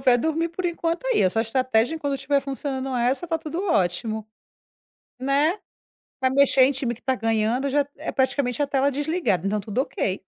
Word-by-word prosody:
pra 255 -2 +5
dormir 320 +5 0
por 360 +3 -6
enquanto 340 +3 -1
é - - +2
isso, 185 +4 +2
a - - +4
estratégia, 250 +3 +1
enquanto 285 -3 -2
estiver 280 +1 +1
funcionando 270 -1 -4
essa, 250 +8 0
tá 325 -1 -1
tudo 325 +4 -4
ótimo, 215 - 0 0.9
né. 285 +8 +2 0.6
Vai 260 - +3
mexer 275 -1 +5
em 275 - +2
time 255 -2 -2
que 235 - -15
tá 260 +2 0
ganhando? 225 +3 0
Eu 275 - -2
já 285 0 +2
é 310 - -4
praticamente 265 -1 0
a 285 - +1
tela 275 0 +2
desligada, 290 - 0
então 210 0 0
tudo 215 +5 -1
ok. 190 -8 -2
270 Hz, 195 wpm, -24 LUFS, 235-295 Hz, 0.9 s, pra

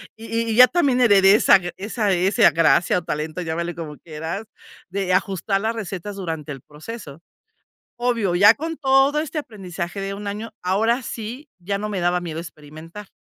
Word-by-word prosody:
Y 230 +1 -3
y - - -1
ya 250 +2 +9
también 280 -7 +1
heredé 200 -4 +6
esa 210 - +6 0.2
esa 210 +1 -1
ese 185 +2 +4
gracia 165 +3 +3
o - - -13
talento, 155 +4 -4
llámale 170 0 -3
como 155 -3 -7
quieras, 165 +6 -6 0.4
de 190 0 -1
ajustar 195 +1 0
las 225 +2 -1
recetas 200 -2 -6
durante 160 -5 -5
el 135 - -11
proceso. 155 - -10 0.8
Obvio, 230 -7 0
ya 205 +5 +7
con 325 +2 -5
todo 270 +1 +3
este 310 0 -4
aprendizaje 195 - -6
de 195 0 -4
un 205 0 -7
año, 210 +3 -5
ahora 220 +7 +1
sí 240 +7 -7
ya 200 +3 -2
no 210 +1 -4
me 200 -3 -3
daba 175 +1 +1
miedo 165 -2 -5
experimentar, 165 +4 -11
195 Hz, 175 wpm, -22 LUFS, 170-230 Hz, 0.8 s, ya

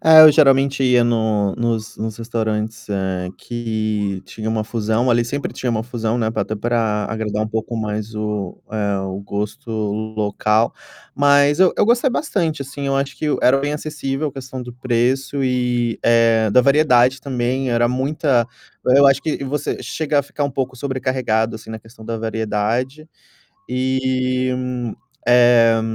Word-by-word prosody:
É, 160 0 +8
eu 155 - +10
geralmente 135 -2 +4
ia 125 -1 +4
no 110 -4 +1
nos 115 -2 -2
nos 110 -1 -4
restaurantes 110 -2 -3 0.5
que 110 -4 -3
tinha 110 0 -6
uma 110 -1 0
fusão, 115 +2 0
ali 120 0 +3
sempre 140 +4 -4
tinha 130 - -4
uma 110 -1 -1
fusão, 115 -1 -2
né, 110 -2 0
para 110 - -1
até 110 - -4
para 110 -1 0
agradar 110 -1 -2
um - - -5
pouco 110 +1 -3
mais 110 0 -4
o 105 -3 -3
eh, 100 -2 -1
o 95 0 -4
gosto 105 +6 -5 0.5
local, 105 +2 +1 0.4
mas 145 +1 +4
eu 185 -1 +5
eu - - +3
gostei 240 +4 +3
bastante 170 - -1
assim, 140 +1 -6
acho 135 0 -1
que 155 - -2 0.2
era 135 +2 +5
bem 145 +2 -2
acessível 150 -1 -3
a - - -9
questão 130 -1 -7
do 120 - -9
preço 130 +3 0
e, 125 -2 0
eh, 115 -1 +4
da 125 - +6
variedade 130 -2 +4
também, 130 0 -2
era 120 0 +2
muita 130 -1 +1 0.5
eu 140 - +6
acho 135 0 +4
que 150 -2 -3
você 145 +2 -3
chega 150 -2 0
a - - -8
ficar 145 +1 -4
um 140 - -1
pouco 130 -1 -3
sobrecarregado 125 -4 -1
assim 110 0 -12
na 110 - -6
questão 110 0 -16
da 115 - -3
variedade. 110 +6 -2 0.6
E, 130 0 0 0.8
eh, 120 -2 +5
120 Hz, 160 wpm, -20 LUFS, 110-135 Hz, 0.8 s, eu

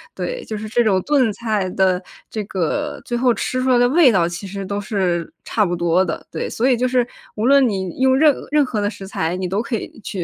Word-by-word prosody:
对， - - -4
就 215 - -5
是 215 +1 -6
这 240 +2 +2
种 195 -4 +3
炖 270 -7 +2
菜 210 -5 -1
的 185 -1 +2 0.3
这 215 -2 -4
个 200 - -2
最 240 - -3
后 245 0 +3
吃 255 +2 -2
出 260 - 0
来 250 - +5
的 245 0 +4
味 295 -4 +6
道 175 -4 +2
其 175 +3 -6
实 195 0 -6
都 200 +1 -3
是 185 -5 -1
差 215 - +1
不 175 -2 0
多 175 +2 +2
的。 - - -4
对， - - -3
所 245 +4 0
以 - - +4
就 250 +2 0
是 245 -1 +1 0.3
无 215 +2 -1
论 275 -1 +5
你 190 0 -4
用 260 0 +4
任 300 -1 +6 0.2
任 295 -1 +3
何 215 -4 -2
的 205 - 0
食 195 -3 -9
材， 165 -2 -2
你 185 0 -3
都 195 +4 -1
可 235 - -3
以 225 - -7
去 185 -3 -4
215 Hz, 270 characters per minute, -20 LUFS, 190-255 Hz, 0.3 s, 味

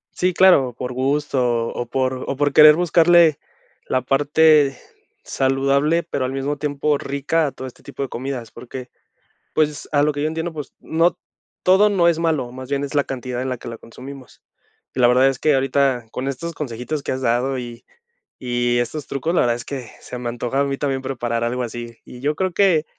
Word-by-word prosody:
Sí, 180 -1 +1
claro, 140 -11 +5
por 125 0 -4
gusto 130 -3 0
o 120 - -4
por 130 +1 -1
o 135 - -3
por 145 0 +1
querer 150 +1 +9
buscarle 170 -2 +4 0.5
la 130 - 0
parte 145 +1 +4 0.5
saludable, 140 +5 +1
pero 140 -5 -3
al 130 - -2
mismo 140 +2 -2
tiempo 145 0 0
rica 145 +3 0
a 140 - -4
todo 130 - -8
este - - -16
tipo 140 - -7
de 135 - -2
comidas, 125 -3 -5
porque, 125 +2 -9 0.6
pues, 150 -1 0
a 145 - +3
lo 150 - +2
que 145 0 -4
yo 155 - +1
entiendo, 160 +2 -3
pues, 150 -4 -8
no, 165 +2 +1 0.5
todo 190 +3 +5
no 180 -4 +3
es 165 -2 +3
malo, 155 -7 0
más 130 +1 -9
bien 140 0 -1
es 145 +1 -5
la 145 - +3
cantidad 125 -2 -5
en 130 - -3
la 125 - -3
que - - -11
la 115 - -7
consumimos, 130 +3 -12 0.5
y - - -3
la 120 - +6
verdad 125 +2 +5
es 135 - -3
que 155 - +3
ahorita 135 -3 +1
con 130 +2 -4
estos 165 +5 -4
consejitos 140 +1 -4
que - - -3
has 130 0 -3
dado 125 +2 +1
y 120 -1 -8 0.6
y 120 -1 0
estos 140 +5 -3
trucos, 140 +5 -2
la - - +4
verdad 120 -1 +1
es 120 - -8
que 130 -5 -6
se 125 - -8
me 120 - -4
antoja 120 +3 -2
a - - +3
mí 140 -1 -2
también 135 -2 -2
preparar 120 -3 -2
algo 125 +1 -1
así, 120 0 -6
y 125 - -12
yo 150 +2 0
creo 185 -1 -1
que 170 -5 +3
135 Hz, 210 wpm, -21 LUFS, 125-150 Hz, 0.6 s, querer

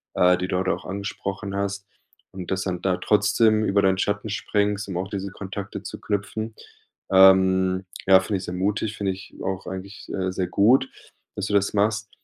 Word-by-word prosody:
äh, 90 0 +4
die 90 0 -3
du 90 - -1
heute 95 0 +1
auch - - -7
angesprochen 100 0 -5
hast. 100 0 -3 0.4
Und 95 -1 -7
dass 95 0 0
dann 90 -2 -3
da 90 -2 +1
trotzdem 110 -1 +3
über 100 -1 +2
deinen 95 -1 +3
Schatten 105 +1 -1
springst, 105 0 -1
um 90 - -3
auch 95 +1 -3
diese 100 -1 -4
Kontakte 100 +1 -6
zu - - -7
knüpfen, 110 +2 -3 0.6
ähm, 95 0 +5 0.2
ja, 95 -1 +8
finde 100 +1 -2
ich 95 - -7
sehr 90 - -5
mutig, 105 +3 -1
finde 100 -2 0
ich 95 - -12
auch 95 0 -3
eigentlich, 95 +1 -8
äh, 95 -1 -1
sehr 90 -1 -2
gut, 130 +6 +4 0.5
dass 105 0 -3
du - - -3
das 100 0 +2
machst. 110 +2 +1
100 Hz, 190 wpm, -24 LUFS, 95-105 Hz, 0.6 s, ja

